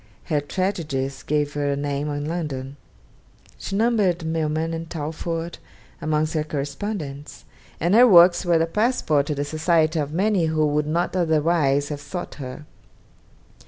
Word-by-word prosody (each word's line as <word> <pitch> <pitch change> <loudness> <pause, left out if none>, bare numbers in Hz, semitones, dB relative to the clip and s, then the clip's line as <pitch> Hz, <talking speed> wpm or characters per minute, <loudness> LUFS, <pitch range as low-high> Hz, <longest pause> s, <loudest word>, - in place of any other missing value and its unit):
Her 150 -3 0
tragedies 145 -6 -2
gave 145 -1 -1
her 145 -1 -1
a - - 0
name 145 +1 -2
in 145 0 -3
London. 145 -5 -4 0.8
She 195 - -4
numbered 200 -6 +2
Milman 160 0 -1
and 165 0 -5
Talfourd 165 +1 -4 0.4
amongst 155 0 0
her 155 -2 0
correspondents; 145 0 -5 0.3
and 175 +3 +1
her 245 +3 +8
works 175 -3 +7
were 175 -2 +2
a 165 - +3
passport 165 - +1
to 150 - -1
the 145 +1 -2
society 155 +1 +1
of 145 -1 -2
many 190 +1 +1
who 155 -1 +1
would 150 0 0
not 170 +4 -1
otherwise 155 -4 +2
have 145 -1 -5
sought 175 +4 -6
her. 130 +3 -7
155 Hz, 150 wpm, -23 LUFS, 145-175 Hz, 0.8 s, her